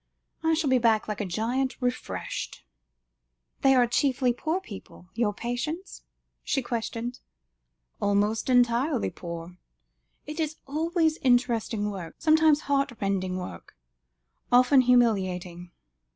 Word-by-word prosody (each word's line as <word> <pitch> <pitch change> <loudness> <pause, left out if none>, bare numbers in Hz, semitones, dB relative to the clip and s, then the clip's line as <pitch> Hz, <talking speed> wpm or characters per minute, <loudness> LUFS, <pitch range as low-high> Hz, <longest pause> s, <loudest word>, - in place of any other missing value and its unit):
I 320 0 +2
shall 310 -4 0
go 255 - +4
back 225 -2 +2
like 210 0 -3
a - - -2
giant 245 +8 -1
refreshed." 245 - -4 1.0
"They 270 0 +5
are 250 -1 +5
chiefly 250 +1 +1
poor 315 +8 -2
people, 200 - -12
your 230 -2 +1
patients?" 250 - -4 0.4
she 270 - -1
questioned. 235 +1 -4 0.8
"Almost 205 +4 +1
entirely 245 +2 +2
poor. 170 0 -8 0.7
It 300 +2 -7
is 315 -1 -1
always 320 +2 0
interesting 235 -4 +1
work, 180 -5 -7
sometimes 315 -1 +4
heartrending 205 -11 -1
work, 180 - -8 0.7
often 255 +2 +6
humiliating. 185 -8 +1
245 Hz, 110 wpm, -27 LUFS, 205-275 Hz, 1.0 s, often